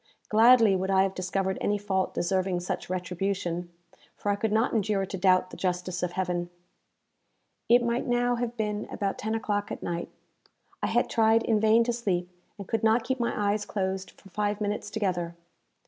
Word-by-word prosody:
Gladly 225 -1 +6
would 190 +1 -1
I 190 0 +4
have 195 -1 -1
discovered 190 +1 -2
any 205 - +1
fault 195 -2 -1
deserving 185 0 0
such 180 - -4
retribution, 180 -1 -2 0.4
for 205 - -1
I - - +1
could 215 +1 -1
not 220 +3 +2
endure 205 -3 +1
to 195 - -6
doubt 185 0 +3
the - - -9
justice 180 -1 -2
of 180 -1 -2
Heaven. 175 -2 -2 1.2
It 240 +1 +6
might 235 +1 -1
now 245 0 +2
have 240 0 -3
been 210 -1 -2
about 200 -2 -3
ten 220 +1 -2
o'clock 205 -2 -2
at - - -6
night. 170 0 -3 0.7
I - - 0
had - - +2
tried 225 0 +3
in 220 -2 +2
vain 220 +2 +5
to 240 +1 -1
sleep, 185 -6 -2 0.3
and 200 -2 -8
could 225 - -1
not 225 +1 +4
keep 260 +2 -2
my 210 -3 0
eyes 210 0 -1
closed 190 -2 -3
for 195 - -16
five 205 +1 -1
minutes 205 0 -2
together. 180 -5 -2
200 Hz, 185 wpm, -27 LUFS, 185-220 Hz, 1.2 s, Gladly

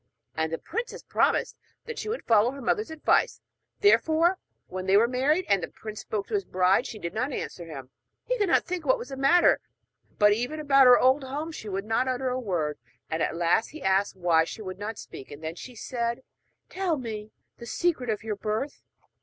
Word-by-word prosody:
And 160 0 -1
the 165 - -1
princess 470 - -5
promised - - +1 0.3
that 470 -1 -6
she 430 - -4
would 460 - -4
follow 225 0 +4
her 275 +2 -7
mother's 420 - 0
advice. 320 -1 +1 0.4
Therefore 345 -2 +4 0.3
when 185 0 -6
they 195 +1 +6
were 230 +3 +5
married, 280 +8 +1
and 200 -2 +3
the - - -3
prince 215 -1 -9
spoke 205 -2 -3
to - - -9
his 405 -1 +1
bride, 185 - +2
she 220 - -7
did 170 -4 -5
not 255 +6 -1
answer 175 -8 -5
him. 135 -5 -9 0.3
He - - -1
could 405 -3 +2
not - - +3
think 360 -2 -3
what 260 -3 +3
was 250 - -8
the 270 - -5
matter, 275 +7 +4 0.6
but 210 -1 +6
even 245 +8 -2
about 275 -3 +5
her 250 -1 +9
old 260 +2 +4
home 290 +5 -4
she 220 -9 -7
would 195 +1 -3
not 225 +4 +1
utter 255 0 -1
a 250 +1 -1
word. 170 -10 -2 0.3
At 160 +1 0
last 175 +6 +2
he 310 -1 -10
asked 195 +1 +2
why 170 -3 +3
she 215 +6 -7
would 185 -1 -7
not 210 +1 -5
speak; 130 - -10
and 145 +2 -11
then 160 +1 -3
she 245 +8 -10
said: 235 +1 -3 0.5
'Tell 370 -4 -1
me 220 -4 -6 0.3
the 235 - -9
secret 280 -3 0
of 215 0 -1
your 215 -2 -3
birth.' 215 +7 -3
235 Hz, 210 wpm, -27 LUFS, 195-290 Hz, 0.6 s, her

